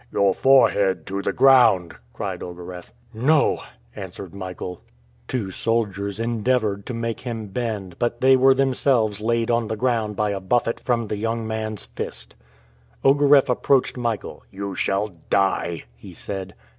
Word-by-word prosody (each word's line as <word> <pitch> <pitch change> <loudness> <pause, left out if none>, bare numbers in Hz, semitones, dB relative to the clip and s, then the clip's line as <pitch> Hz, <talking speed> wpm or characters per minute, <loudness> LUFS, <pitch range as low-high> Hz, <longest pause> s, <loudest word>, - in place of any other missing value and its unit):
"Your 100 -1 +3
forehead 100 -10 +3
to 100 +1 -3
the - - -1
ground!" 120 -11 +5 0.2
cried - - -5
Ogareff. 90 0 -8 0.2
"No!" 145 +8 +2 0.3
answered 95 -2 -8
Michael. 90 -2 -7 0.5
Two 110 -7 -3
soldiers 100 -2 0
endeavored 115 -3 0
to 125 - -4
make 115 -1 -3
him 115 -4 -6
bend, 100 -5 -4
but 120 0 -1
they 130 +1 +6
were 130 +1 +5
themselves 130 -5 +1
laid 115 +1 0
on 115 -1 +1
the 110 - -3
ground 115 -3 0
by 105 0 0
a 100 - -3
buffet 115 +4 0
from 120 -2 0
the 105 0 -4
young 115 +1 -2
man's 110 -2 -4
fist. - - -7 0.7
Ogareff 140 0 +5
approached 130 +1 +2
Michael. 120 -3 -3
"You 100 0 -5
shall 100 +3 0 0.2
die!" 95 -4 +1
he - - -13
said. 95 -1 -6
110 Hz, 145 wpm, -23 LUFS, 100-120 Hz, 0.7 s, they